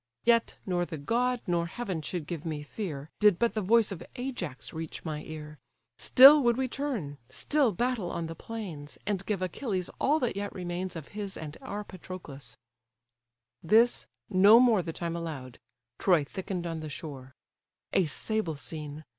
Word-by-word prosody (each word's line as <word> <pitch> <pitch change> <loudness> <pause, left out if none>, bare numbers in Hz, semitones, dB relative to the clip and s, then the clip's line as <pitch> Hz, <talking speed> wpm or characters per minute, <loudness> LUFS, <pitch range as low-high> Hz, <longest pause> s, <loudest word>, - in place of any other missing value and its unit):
Yet, 230 -1 +3
nor 180 -2 +1
the 170 -2 -5
god, 240 - 0
nor 170 -1 +1
heaven, 190 -4 -4
should 160 +1 -4
give 165 -1 -5
me 155 -3 -3
fear, 150 -3 -5
Did 210 -4 +6
but 235 0 +2
the 215 - -1
voice 220 +2 +4
of 190 - -6
Ajax 245 - -5
reach 160 +1 -6
my 155 -2 -3
ear: 150 -2 -8 0.4
Still 280 +4 +9
would 240 -2 +3
we 260 0 +1
turn, 235 - -3
still 275 - +2
battle 235 -2 -1
on 170 - -3
the 165 - -5
plains, 170 -9 -7
And 200 -2 -1
give 200 -3 0
Achilles 185 0 -2
all 300 +3 +3
that 245 - 0
yet 200 0 -3
remains 180 0 -3
Of 160 -3 -7
his 205 -2 -4
and 155 -1 -7
our 210 -6 -5
Patroclus—" 145 - -9 1.0
This, 225 +8 +4 0.2
no 205 +4 +7
more 235 -6 +5
The 165 - -4
time 170 +1 -3
allow'd: 145 -7 -6 0.4
Troy 175 -6 +4
thicken'd 180 +3 -4
on 165 -1 -3
the 155 -1 -6
shore. 140 -4 -8 0.6
A 185 - +4
sable 175 +3 -1
scene! 150 +1 -6
180 Hz, 170 wpm, -29 LUFS, 155-220 Hz, 1.0 s, Still